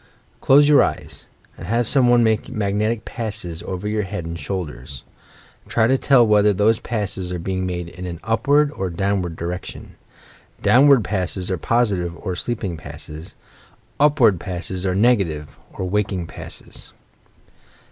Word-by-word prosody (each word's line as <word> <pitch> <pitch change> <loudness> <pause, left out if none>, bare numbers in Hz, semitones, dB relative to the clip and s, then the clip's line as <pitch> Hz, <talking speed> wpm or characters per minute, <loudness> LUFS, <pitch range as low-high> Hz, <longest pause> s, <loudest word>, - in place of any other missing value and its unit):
Close 145 +2 +5
your 150 -1 +6
eyes, - - -3 0.3
and - - -8
have 115 +1 +1
some 130 -2 +4
one 120 -1 +5
make 110 -1 +1
mag 100 -2 -2
netic 110 +2 -1
passes 105 -8 -5
over 95 +2 -5
your 105 0 0
head 95 -3 -5
and 85 0 -6
shoulders. 70 -6 -6 0.6
Try 110 - +2
to 130 +4 +3
tell 135 -2 +4
whether 105 -1 +4
those 105 +4 +2
passes 95 -5 -3
are 90 - -2
being 95 +2 -3
made 90 -1 -4
in 90 +2 -8
an 85 -2 -6
upward 140 +7 +2
or 95 -9 -3
downward 90 -1 -1
direction. 85 +2 -7 0.6
Downward 135 -2 +5
passes 95 -1 -2
are 95 - 0
positive 100 -8 0
or 95 -4 -4
sleeping 100 -4 -3
passes; 75 +1 -9 0.6
upward 140 - +4
passes 95 0 -3
are 90 - 0
negative 95 -9 +1 0.2
or 95 - -4
waking 95 -2 -1
passes. 80 - -7
100 Hz, 150 wpm, -21 LUFS, 90-115 Hz, 0.6 s, your